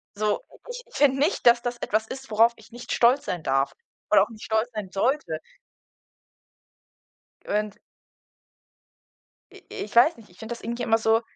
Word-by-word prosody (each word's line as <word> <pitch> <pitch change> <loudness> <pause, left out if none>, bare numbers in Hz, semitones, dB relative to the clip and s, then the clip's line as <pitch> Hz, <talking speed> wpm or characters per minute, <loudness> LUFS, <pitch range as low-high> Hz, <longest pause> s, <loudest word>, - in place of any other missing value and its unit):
So, 210 - 0 0.3
ich - - -7
ich - - -18
finde 275 -2 +3
nicht, 295 -4 +1
dass 240 0 +6
das 245 0 -3
etwas 220 0 -1
ist, 265 -1 -8
worauf 230 +2 +4
ich 220 +1 -18
nicht 240 +1 -9
stolz 250 +4 +3
sein 175 -3 -4
darf 135 +1 +1 0.4
oder - - +7
auch - - -5
nicht 215 -2 -12
stolz 220 +2 0
sein 210 -3 -5
sollte. 265 +9 -1 2.1
Und 210 0 -1 1.7
i - - -16
ich 210 - -7
weiß 250 +8 +6
nicht, 225 -2 -17
ich 180 - -22
finde 220 +2 -6
das 235 - -10
irgendwie 235 +2 -4
immer 225 -1 +3
so 225 0 +2
230 Hz, 170 wpm, -25 LUFS, 215-245 Hz, 2.1 s, oder